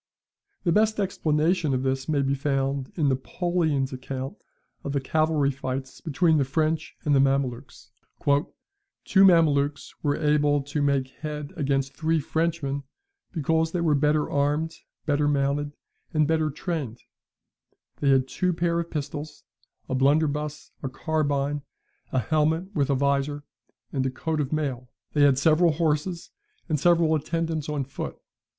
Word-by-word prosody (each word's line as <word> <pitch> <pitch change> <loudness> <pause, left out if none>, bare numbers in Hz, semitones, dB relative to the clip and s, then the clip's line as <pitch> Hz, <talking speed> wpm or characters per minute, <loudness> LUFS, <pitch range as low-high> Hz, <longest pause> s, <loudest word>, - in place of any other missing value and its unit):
[The 170 - +2
best 215 +3 +3
explanation 160 -4 +1
of 130 - -1
this 135 +2 -1
may 145 -3 +2
be 135 0 +1
found 135 -1 -1
in 155 -5 +1
Napoleon's 145 0 0
account 130 +1 -5 0.5
of 140 - -3
the 140 - +1
cavalry 155 0 +1
fights 130 0 -5
between 160 +1 +2
the - - +3
French 155 +3 -1
and 145 - +3
the 135 - +5
Mamelukes: 135 -2 -1 1.1
"Two 195 -1 +5
Mamelukes 150 -6 +3
were 145 -1 +1
able 150 -2 +2
to 145 +2 -3
make 140 -2 +1
head 150 +2 -6
against 135 -3 0
three 160 0 +1
Frenchmen, 155 -2 -1 0.5
because 160 0 0
they 175 - 0
were 160 -3 +3
better 150 +1 +2
armed, 150 +3 0 0.3
better 145 -1 +2
mounted, 145 0 +1 0.4
and 155 -1 +3
better 160 -1 +2
trained; 145 - -4 0.9
they 140 - +1
had 130 -1 +4
two 180 +6 0
pair 170 0 0
of 170 0 -3
pistols, 150 0 -5 0.4
a 130 - -3
blunderbuss, 150 +2 +1
a 135 - -3
carbine, 145 -1 -1 0.5
a - - -1
helmet 160 - +1
with 145 -5 +1
a 140 - +3
vizor, 140 +1 0 0.5
and 135 -2 0
a - - 0
coat 155 +4 -2
of 140 - -3
mail; 135 -5 -2 0.2
they 150 - +2
had 140 -2 +5
several 160 +3 +4
horses, 165 +2 -1 0.4
and 155 -4 0
several 170 0 +4
attendants 160 0 -1
on 150 -2 -1
foot. 135 +1 -6
150 Hz, 145 wpm, -26 LUFS, 140-160 Hz, 1.1 s, the